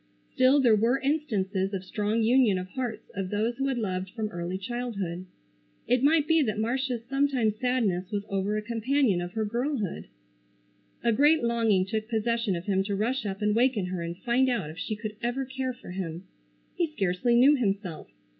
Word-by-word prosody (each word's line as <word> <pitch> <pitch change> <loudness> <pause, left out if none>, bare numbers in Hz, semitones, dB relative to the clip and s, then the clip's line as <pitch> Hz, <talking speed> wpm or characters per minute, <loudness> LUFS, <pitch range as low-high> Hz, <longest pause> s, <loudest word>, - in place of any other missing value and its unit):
Still 260 +3 +5
there 240 -5 +5
were 235 +5 +2
instances 205 -10 -1
of 185 - -4
strong 215 +3 0
union 235 -4 +4
of 185 0 -5
hearts 245 0 -5
of 195 -2 -3
those 220 +4 -1
who 270 0 0
had 265 -2 -1
loved 190 -4 -2
from 215 +1 -4
early 175 +1 -4
childhood. 195 -5 -4 0.6
It 250 0 +2
might 300 +1 +4
be 325 -1 +4
that 215 -6 0
Marcia's 240 +1 -1
sometime 270 -4 +1
sadness 215 -6 0
was 205 -1 -3
over 195 +2 -1
a 215 - -3
companion 230 -2 +1
of 175 +1 -6
her 220 -1 -1
girlhood. 235 - -2 1.0
A 235 - +3
great 295 +4 +4
longing 225 -5 +2
took 215 +3 -3
possession 230 -2 0
of 170 +1 -5
him 195 -2 +1
to 200 0 -1
rush 230 +3 -1
up 195 +1 -4
and 210 0 +2
waken 240 -4 +2
her 180 - -3
and 170 +1 -5
find 255 +4 +2
out 195 -11 -1
if 165 - -11
she 215 - -3
could 210 0 -6
ever 245 +3 -1
care 260 0 -3
for 245 -7 -11
him. 180 -2 -5 0.5
He 345 - +1
scarcely 200 -1 +1
knew 270 +5 +6
himself. 195 - -2
220 Hz, 190 wpm, -27 LUFS, 195-255 Hz, 1.0 s, knew